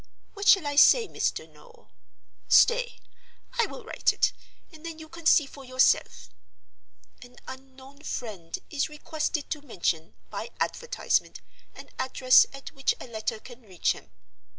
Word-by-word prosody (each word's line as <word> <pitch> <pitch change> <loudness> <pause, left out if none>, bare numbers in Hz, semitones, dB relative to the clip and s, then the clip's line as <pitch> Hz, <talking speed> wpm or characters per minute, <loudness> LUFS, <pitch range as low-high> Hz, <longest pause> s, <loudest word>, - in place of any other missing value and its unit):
What 405 -1 -5
shall 385 -6 +6
I 285 0 -3
say, 460 +9 +7
Mr. - - -2
Noel? 470 -1 -20 0.6
Stay; - - +4 0.6
I 465 - +4
will - - -10
write - - +1
it, - - +1 0.4
and 315 -1 -15
then 330 -1 -7
you 315 0 -11
can 335 0 -5
see 300 - +6
for 275 0 -13
yourself: 250 - +1 0.9
'An 245 0 -14
Unknown 265 +1 -12
Friend 205 - -6
is 300 0 -1
requested 300 0 -4
to 300 - -3
mention 175 - -3 0.2
(by - - -5
advertisement) 475 0 -1 0.3
an - - -12
address 255 0 +5
at 275 0 -10
which 270 - 0
a - - -8
letter 220 -3 -4
can 245 +3 -14
reach 190 -6 -1
him. - - -8
275 Hz, 150 wpm, -27 LUFS, 245-320 Hz, 0.9 s, say